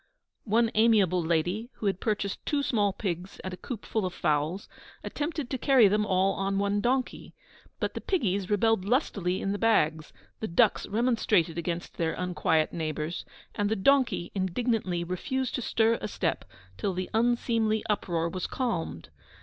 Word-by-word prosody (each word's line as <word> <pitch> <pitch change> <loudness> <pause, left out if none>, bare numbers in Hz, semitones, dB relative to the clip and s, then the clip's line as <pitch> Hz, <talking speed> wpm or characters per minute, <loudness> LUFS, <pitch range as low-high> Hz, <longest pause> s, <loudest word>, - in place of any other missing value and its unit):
One 230 +1 +2
amiable 210 -5 +4
lady, 175 +8 0
who - - -7
had 195 -2 +1
purchased 205 -3 -2
two 290 -1 0
small 205 -7 +2
pigs 185 -1 -4
and 185 - -5
a - - -6
coop 225 +3 -7
full 220 - -1
of 180 -1 -3
fowls, 155 +6 0 0.4
attempted 300 -2 -3
to 260 - -2
carry 260 -5 +6
them 210 +1 +1
all 190 +1 +2
on 195 0 -1
one 200 +1 +1
donkey. 255 +3 -1 0.4
But - - -1
the - - -5
piggies 200 - 0
rebelled 215 -1 +2
lustily 200 - 0
in 195 - -1
the 205 - -2
bags, 160 -9 +2 0.3
the 220 - -3
ducks 170 - +2
remonstrated 210 -7 +1
against 170 0 -4
their 165 -1 0
unquiet 160 -3 0
neighbours, 155 0 -3 0.3
and 205 0 0
the 220 - +1
donkey 240 -4 +2
indignantly 190 -2 -1
refused 250 +9 -2
to - - -2
stir 230 0 +2
a - - -2
step - - -2 0.3
till 195 -3 -1
the 185 0 -4
unseemly 225 -1 +1
uproar 175 -6 0
was 185 +1 -3
calmed. 175 - -3
200 Hz, 165 wpm, -28 LUFS, 180-230 Hz, 0.4 s, carry